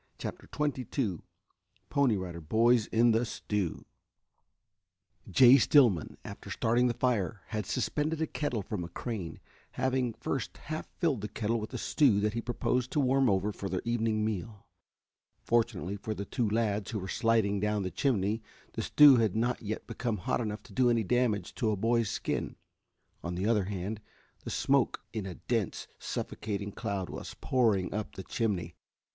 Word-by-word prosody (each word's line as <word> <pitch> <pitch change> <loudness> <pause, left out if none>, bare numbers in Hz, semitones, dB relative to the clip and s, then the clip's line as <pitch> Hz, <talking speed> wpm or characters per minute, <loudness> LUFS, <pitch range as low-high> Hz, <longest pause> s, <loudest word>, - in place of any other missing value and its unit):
CHAPTER - - -7
XXII 130 - -1 0.7
PONY 130 -7 +3
RIDER 90 -3 -5
BOYS 115 +7 +3
IN 115 +1 +4
THE 115 +2 +2
STEW 105 -6 -3 1.4
Jay 125 +8 +8
Stillman, 120 - +4
after - - -8
starting 120 +2 +2
the 120 - -1
fire, 110 -6 0
had 105 -3 -3
suspended 150 +6 -1
a 160 - +1
kettle 135 -9 -2
from 95 -2 -4
a - - -5
crane, 95 - -5 0.3
having 130 -2 0
first 120 +3 -3
half 155 +1 -5
filled 150 - +1
the 105 - -3
kettle 115 +2 -1
with 110 - -6
a - - -4
stew 125 -9 +3
that 105 0 +1
he 115 - -2
proposed 125 +1 -1
to - - +2
warm 135 -1 +3
over 100 +1 +1
for 100 -1 -5
their 90 0 -2
evening 115 -2 +1
meal. 105 0 -4 0.8
Fortunately 110 -5 0
for 110 +2 -4
the 100 - -4
two 120 -1 -1
lads 105 -2 0
who 115 - -3
were 95 -2 -5
sliding 110 -2 +2
down 105 0 0
the 95 - -3
chimney 110 -5 0 0.3
the - - -3
stew 145 -3 +7
had 110 -4 +2
not 120 +2 0
yet 110 -1 -4
become 115 -3 -2
hot 90 - -1
enough 105 -2 -4
to - - -15
do 130 -1 +3
any 115 -2 +2
damage 120 -1 +1
to 115 - 0
a 105 - +1
boy's 115 +1 +1
skin. - - -2 0.7
On 85 +1 -3
the 95 +3 -2
other 105 -3 +2
hand, 100 +2 -4 0.4
the - - -4
smoke - - +1
in 105 -3 -3
a 90 - -6
dense, 115 -6 -2
suffocating 105 -1 -4
cloud 95 -2 -3
was - - -7
pouring 110 -8 +2
up 105 0 -4
the 95 - -6
chimney. 95 -6 -2
110 Hz, 170 wpm, -30 LUFS, 100-120 Hz, 1.4 s, Jay